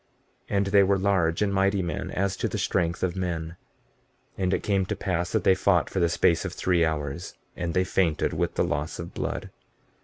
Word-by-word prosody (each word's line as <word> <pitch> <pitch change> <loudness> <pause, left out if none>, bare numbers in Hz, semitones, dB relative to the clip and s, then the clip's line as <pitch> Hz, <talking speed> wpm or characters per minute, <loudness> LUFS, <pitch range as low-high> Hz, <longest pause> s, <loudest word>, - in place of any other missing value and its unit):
And 100 0 +1
they 100 +1 +5
were 100 0 +3
large 95 -3 +1
and 100 -1 0
mighty 95 0 +2
men 85 - -3
as 100 +1 -1
to - - 0
the - - -3
strength 85 0 0
of 90 -1 0
men. 85 -3 -3 0.8
15:27 - - -1
And 90 +1 +1
it - - -4
came 100 -2 +1
to 105 - -2
pass 90 -2 -2
that - - +1
they 95 - +6
fought 95 -2 +2
for 95 - -1
the 85 -1 +3
space 85 0 +2
of - - -4
three 90 -2 +1
hours, 80 0 -3 0.2
and 85 -1 -3
they 95 - +3
fainted 90 -4 +1
with - - -1
the - - +2
loss 75 +2 -2
of 85 +1 -7
blood. - - -4
90 Hz, 215 wpm, -26 LUFS, 85-95 Hz, 0.8 s, they